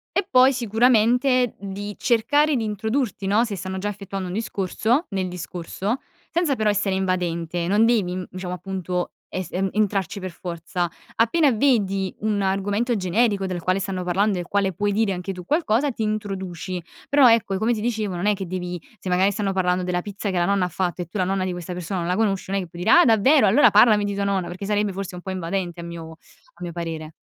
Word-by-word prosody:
E 390 - +1
poi 255 +1 +6
sicuramente 245 +2 +3
di 200 +1 -6
cercare 290 +5 +2
di 235 - 0
introdurti 220 +1 -2
no, 205 +4 +3
se 215 -4 -4
stanno 190 0 -5
già 205 +2 -2
effettuando 195 -2 -5
un 180 - -5
discorso, 220 - 0
nel 190 -2 -2
discorso, 180 +6 -4 0.3
senza 330 -5 +1
però 215 -3 +1
essere 205 -1 +1
invadente. 175 -2 -1
Non 205 +4 +4
devi 185 -6 +1
diciamo 180 0 -5
appunto 180 -1 -3
es 185 -3 -5
entrarci 195 +1 -1
per 185 -1 -5
forza. 175 0 -4 0.3
Appena 280 +7 +3
vedi 205 -6 +1
un 210 -1 0
argomento 205 +5 0
generico 200 +1 +1
del 180 -2 -4
quale 185 +1 +1
stanno 190 -1 -3
parlando 190 +2 +1
e - - -2
il 175 - -9
quale 200 -1 +1
puoi 205 +3 -1
dire 205 -1 +1
anche 180 +1 -4
tu 180 -1 -8
qualcosa 285 - +1
ti 225 - -4
introduci 190 -4 -3 0.3
però 280 -2 +6
ecco, 225 -4 +2
e - - 0
come 220 +4 +1
ti 215 - -3
dicevo, 215 -4 -1
non 175 +4 -1
è 210 - +3
che 195 -1 -5
devi 180 0 -4 0.2
se 185 - -5
magari 185 +2 +3
stanno 205 -1 -1
parlando 185 -1 +1
della 180 0 -1
pizza 205 0 -4
che 185 - -1
la 175 - +2
nonna 200 0 +2
ha - - -1
fatto 180 +1 -2
e 175 - -5
tu 175 - -6
la 185 - +2
nonna 190 0 0
di 185 - -2
questa 175 0 -6
persona 180 +1 -3
non 170 - -2
la 180 - +1
conosci 195 -3 0
non 195 - +1
è - - -3
che 175 - -11
puoi 175 +1 -7
dire:" - - +5
Ah - - +6
davvero! 250 +6 +5
Allora 235 +3 +6
parlami 210 0 +6
di 200 - -2
tua 200 0 -1
nonna". 195 -2 0
Perché 185 +3 -6
sarebbe 210 -1 0
forse 195 -1 -5
un 180 - -8
po' 190 - -5
invadente 180 -1 -3
a - - -6
mio 170 -1 -8
a 170 +1 -21
mio 175 - -4
parere. 165 -2 -5
195 Hz, 220 wpm, -23 LUFS, 180-215 Hz, 0.3 s, poi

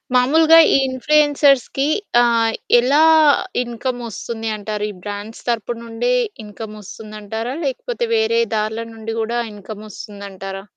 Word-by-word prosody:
మాములుగా 315 +6 +5 0.2
ఈ - - +5
ఇన్ఫ్లుయెన్సర్స్‌కి 280 0 +2 0.3
ఆహ్, 230 -1 +2 0.3
ఎలా 275 +5 +3 0.6
ఇన్‌కమ్ 245 +1 -4
వస్తుంది 225 +1 -5
అంటారు? 210 0 -4
ఈ - - -11
బ్రాండ్స్ 205 +2 -7
తరుపు 235 0 -2
నుండే 230 - -2 0.3
ఇన్‌కమ్ 215 +1 -9
వస్తుందంటారా? 215 +4 -7
లేకపోతే 475 - -3
వేరే 450 +1 +2 0.2
దార్ల 220 +2 -2
నుండి 225 0 -6
గూడా 235 +2 -1
ఇన్‌కమ్ 210 +1 -10
వస్తుందంటారా? 195 -2 -8
230 Hz, 115 wpm, -19 LUFS, 210-260 Hz, 0.6 s, మాములుగా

